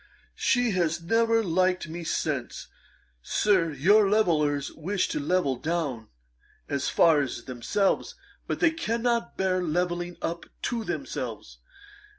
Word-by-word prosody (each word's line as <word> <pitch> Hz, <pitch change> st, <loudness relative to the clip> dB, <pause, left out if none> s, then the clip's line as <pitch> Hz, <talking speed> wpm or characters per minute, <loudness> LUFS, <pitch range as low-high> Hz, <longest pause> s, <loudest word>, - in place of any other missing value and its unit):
She 245 Hz, -3 st, +2 dB
has 170 Hz, -3 st, 0 dB
never 225 Hz, +5 st, +2 dB
liked 185 Hz, -1 st, +1 dB
me 170 Hz, +2 st, -6 dB
since. 145 Hz, -6 st, -3 dB, 0.5 s
Sir, 185 Hz, -, +2 dB
your 195 Hz, +9 st, +4 dB
levellers 150 Hz, -9 st, +2 dB
wish 185 Hz, +4 st, -1 dB
to -, -, -2 dB
level 145 Hz, -3 st, +1 dB
down 145 Hz, -7 st, -2 dB, 0.6 s
as 140 Hz, -1 st, -1 dB
far 160 Hz, -3 st, +4 dB
as 130 Hz, -3 st, -4 dB
themselves; 130 Hz, -, -1 dB, 0.3 s
but -, -, -3 dB
they 340 Hz, -2 st, +5 dB
cannot 235 Hz, -6 st, -1 dB
bear 185 Hz, -1 st, +1 dB
levelling 175 Hz, +1 st, -1 dB
up 170 Hz, +1 st, -3 dB, 0.2 s
to 235 Hz, -2 st, -1 dB
themselves. -, -, -5 dB
175 Hz, 125 wpm, -27 LUFS, 155-205 Hz, 0.6 s, they